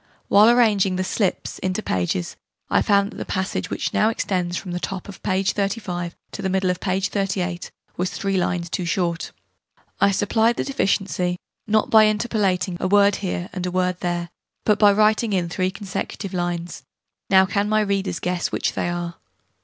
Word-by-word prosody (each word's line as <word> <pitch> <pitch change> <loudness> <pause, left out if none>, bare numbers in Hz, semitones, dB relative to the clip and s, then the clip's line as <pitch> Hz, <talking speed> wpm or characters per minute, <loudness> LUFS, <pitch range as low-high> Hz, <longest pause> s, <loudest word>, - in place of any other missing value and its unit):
While 210 +3 +7
arranging 210 -6 +3
the 185 - 0
'slips' 190 0 -1
into 185 +3 -2
pages, 90 -1 -1 0.4
I - - +4
found 200 -1 +2
that - - -11
the - - -3
passage, 190 0 -2
whichnow 215 - +1
extends 180 -5 -1
from 185 - -6
the 175 - -2
top 190 0 -5
of 200 - -10
p. 190 +1 0
35 190 -3 -2 0.2
to - - -6
the 190 - -1
middle 190 -1 +1
of 180 - -4
p. 185 -1 0
38, 190 -3 -2 0.3
was 180 +1 0
3 195 -1 -2
lines 175 -2 -1
too 180 - -1
short. 170 -1 -1 0.7
I - - +5
supplied 220 +4 +2
the - - -1
deficiency, 195 -8 0 0.3
not 215 0 +2
by 220 -1 +8
interpolating 205 -5 0
a - - 0
word 200 0 +4
here 180 -2 -3
and 185 -1 -4
a - - -1
word 180 0 0
there, 175 -1 -2 0.3
but 210 -1 +3
by 205 -1 +7
writing 215 +1 +3
in 175 -3 0
3 185 +2 0
consecutive 195 0 -5
lines. 175 -2 -3 0.5
Now 190 -1 +6
can 200 +2 0
my 215 0 +3
readers 195 -3 -1
guess 180 -1 -1
which - - -1
they - - -1
are? 175 -1 -4
190 Hz, 180 wpm, -22 LUFS, 180-205 Hz, 0.7 s, by